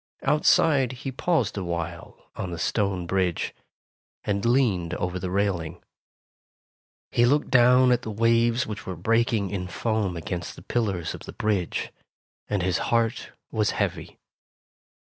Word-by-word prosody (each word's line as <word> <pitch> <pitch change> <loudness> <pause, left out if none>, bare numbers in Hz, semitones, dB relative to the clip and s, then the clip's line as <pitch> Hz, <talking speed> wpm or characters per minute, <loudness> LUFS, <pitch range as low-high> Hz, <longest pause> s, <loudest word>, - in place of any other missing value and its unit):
Outside 145 -3 +3
he 130 +2 -6
paused 130 - 0
awhile 85 -2 -6
on 95 - -4
the 85 - -5
stone 95 0 0
bridge, 90 -1 0 0.7
and 100 -1 -1
leaned 115 -9 +2
over 90 +1 -2
the 90 - -3
railing. 90 -4 -1 1.3
He 120 - +3
looked 145 +5 +2
down 125 0 +6
at 125 - +3
the - - -6
waves 115 +2 +2
which 105 -2 -7
were 95 - -3
breaking 115 +2 +1
in 90 -3 -3
foam 105 -2 -1
against 85 +1 -5
the - - -13
pillars 100 -8 -1
of - - -9
the - - -9
bridge, 100 -5 -1 0.6
and 100 -3 -1
his 90 -1 +1
heart 115 -1 0 0.2
was - - +1
heavy. - - -2
105 Hz, 140 wpm, -25 LUFS, 90-120 Hz, 1.3 s, down